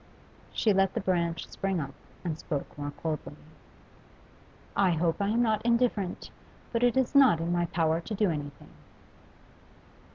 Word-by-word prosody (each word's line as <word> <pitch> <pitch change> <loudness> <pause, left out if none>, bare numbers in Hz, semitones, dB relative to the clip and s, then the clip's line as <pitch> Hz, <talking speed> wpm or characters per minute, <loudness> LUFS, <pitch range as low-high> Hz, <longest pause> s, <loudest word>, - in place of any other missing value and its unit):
She 215 - +2
let 195 0 +2
the - - +1
branch 170 -3 -1
spring 195 -2 -2
up, 140 -3 -5 0.3
and 165 -3 -1
spoke 150 -2 -5
more 145 0 -4
coldly. 155 -2 -3 1.4
'I 195 -2 +4
hope 165 +3 0
I 200 - +1
am 230 +3 +2
not 215 -2 +1
indifferent; 235 -5 0 0.4
but 230 - +1
it 245 +1 +3
is 260 +1 +1
not 265 - +6
in 165 +1 -1
my 175 -1 +1
power 165 -1 +1
to 215 +5 -5
do 200 -3 +2
anything. 145 -2 -6
180 Hz, 155 wpm, -29 LUFS, 165-215 Hz, 1.4 s, not